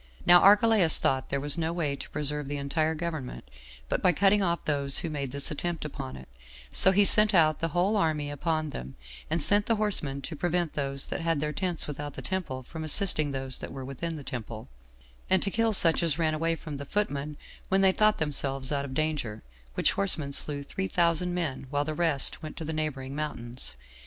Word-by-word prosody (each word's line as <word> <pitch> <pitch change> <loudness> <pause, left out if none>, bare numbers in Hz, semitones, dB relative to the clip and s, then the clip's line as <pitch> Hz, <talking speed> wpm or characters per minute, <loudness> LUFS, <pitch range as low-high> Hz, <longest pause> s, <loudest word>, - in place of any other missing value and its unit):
Now 175 0 +7
Archelaus 205 -3 +5
thought 130 -1 0
there 140 - -1
was 145 +3 +1
no 165 0 -1
way 160 -5 -2
to - - -9
preserve 150 -1 -1
the 145 +1 -4
entire 155 +3 -1
government 155 -5 -6 0.4
but - - -2
by 180 - +3
cutting 200 +4 +3
off 170 -3 -1
those 140 -2 +2
who 165 - -4
made 140 -3 -4
this 140 +1 -1
attempt 165 +2 -4
upon 65 - -7
it; 65 - -13 0.4
so - - +5
he 200 +2 +4
sent 210 0 +7
out 155 -3 +3
the 165 - -1
whole 180 +6 0
army 155 -6 -1
upon 155 +1 -2
them, 65 - -8 0.3
and 160 -1 +4
sent 205 0 +5
the 230 - +2
horsemen 185 -10 -1
to 160 - -6
prevent 175 +1 -1
those 140 -1 -2
that - - -4
had 165 -2 0
their 150 +1 -3
tents 180 0 -1
without 145 0 -6
the - - -8
temple 170 -9 -4
from 160 +5 -8
assisting 155 -2 +3
those 135 -2 -2
that - - -8
were 135 -1 -7
within 160 +5 -5
the 150 - -8
temple, 115 -4 -7 0.6
and 190 -1 +3
to 195 - +1
kill 225 +2 +1
such 170 -5 +4
as 165 -3 +2
ran 160 -2 0
away 165 +2 -1
from 155 -2 -8
the 140 - -7
footmen 150 -6 -3 0.3
when 190 +1 +2
they 190 -1 +6
thought 215 +2 +2
themselves 135 -3 -1
out 140 -1 -1
of 130 -1 -8
danger; 150 -9 -2 0.3
which - - +2
horsemen 160 -8 0
slew 145 0 -1
three 190 +7 -4
thousand 170 0 +2
men, 155 -7 -4
while 145 +1 -1
the 155 - -3
rest 155 -4 +1
went 155 -2 -9
to 165 - -6
the 160 - -4
neighboring 140 -4 -4
mountains. 120 - -5
155 Hz, 210 wpm, -27 LUFS, 140-175 Hz, 0.6 s, Now